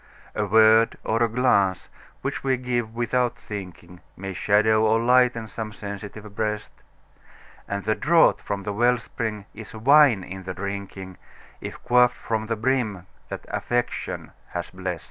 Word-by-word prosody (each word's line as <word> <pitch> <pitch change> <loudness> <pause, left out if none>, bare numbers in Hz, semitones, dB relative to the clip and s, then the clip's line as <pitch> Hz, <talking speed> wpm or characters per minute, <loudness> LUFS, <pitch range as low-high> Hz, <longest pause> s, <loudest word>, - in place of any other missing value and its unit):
A 105 - -1
word 110 +2 +5
or 115 +1 0
a 120 - +3
glance 100 -6 +2 0.4
which - - -3
we 130 -1 +1
give 120 -3 -2
"without 120 0 0
thinking", 90 -5 -9 0.2
May 95 +1 -5
shadow 110 +3 +3
or 110 +1 +3
lighten 125 -1 +3
some 110 0 -6
sensitive 100 0 -8
breast; 105 -1 -2 1.0
And 100 0 -3
the 110 - +1
draught 165 +7 +4
from 100 -1 -4
the 105 - -3
well 120 +3 +3
spring 110 -4 -5
is 110 0 -10
wine 130 -3 +5
in 95 +1 -8
the 90 -1 -6
drinking, 100 -1 -6 0.4
If - - -8
quaffed 125 0 +4
from 110 -1 -3
the 115 - -1
brim 110 -5 -1 0.2
that - - -7
Affection 120 0 -2 0.2
has - - -4
blest. - - -4
110 Hz, 150 wpm, -24 LUFS, 100-120 Hz, 1.0 s, word